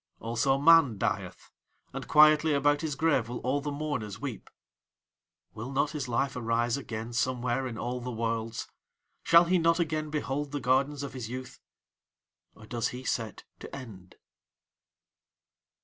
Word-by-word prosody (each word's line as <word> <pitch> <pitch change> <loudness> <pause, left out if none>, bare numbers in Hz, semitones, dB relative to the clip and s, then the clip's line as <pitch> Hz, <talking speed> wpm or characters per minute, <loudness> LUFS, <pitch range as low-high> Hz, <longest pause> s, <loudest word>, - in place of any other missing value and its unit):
"Also 120 +4 +1
man 145 -6 +6
dieth. 100 -4 -3 0.4
And - - -6
quietly 155 0 +6
about 145 +1 +2
his 155 -3 -2
grave 135 -6 +1
will 120 - -4
all 135 +3 0
the 145 - -3
mourners 140 -9 -4
weep. 130 -3 -6 1.0
"Will 115 +5 -6
not 140 +2 +1
his 145 -5 -4
life 125 +3 0
arise 115 0 0
again 115 -4 -6
somewhere 125 +1 0
in 115 -3 -6
all 125 +1 -3
the 125 - -5
worlds? 115 0 -3 0.5
Shall 170 +1 +6
he 180 +1 +2
not 165 +1 +3
again 155 -2 -1
behold 145 -1 -3
the 145 - -1
gardens 135 +3 +1
of 140 -3 -6
his 125 -4 -6
youth? 130 +1 -7 1.0
Or 110 - -14
does 120 +1 -2
he 125 +1 -7
set 115 -4 -3 0.2
to - - -9
end?" 105 -9 -11
130 Hz, 150 wpm, -29 LUFS, 115-145 Hz, 1.0 s, man